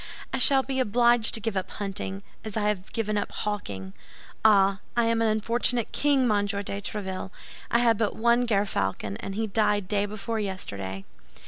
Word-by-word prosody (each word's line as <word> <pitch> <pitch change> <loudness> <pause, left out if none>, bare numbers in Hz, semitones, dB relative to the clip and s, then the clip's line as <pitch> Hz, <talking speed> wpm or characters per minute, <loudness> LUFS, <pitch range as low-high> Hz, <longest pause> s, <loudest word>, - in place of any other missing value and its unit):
I - - 0
shall 270 -2 +6
be 265 0 -2
obliged 240 -1 +3
to - - +1
give 220 -1 -3
up 190 - -2
hunting, 195 -1 -4 0.2
as 215 -1 -5
I 210 -1 +2
have 195 -2 -3
given 215 -2 -1
up - - -4
hawking. 100 - -4 0.5
Ah, 200 -2 +5 0.2
I 235 - +4
am 230 0 +1
an 225 - +3
unfortunate 230 +2 +1
king, 280 -3 +2
Monsieur 205 -1 0
de 200 0 -5
Tréville! 190 -2 -5 0.4
I - - +3
had 230 -2 +3
but 220 -3 0
one 235 +2 +2
gerfalcon, 105 - -1
and 195 - -5
he 220 +1 0
died 210 -2 +1
day 205 0 0
before 215 +2 -4
yesterday." 100 - -5
210 Hz, 180 wpm, -26 LUFS, 195-230 Hz, 0.5 s, shall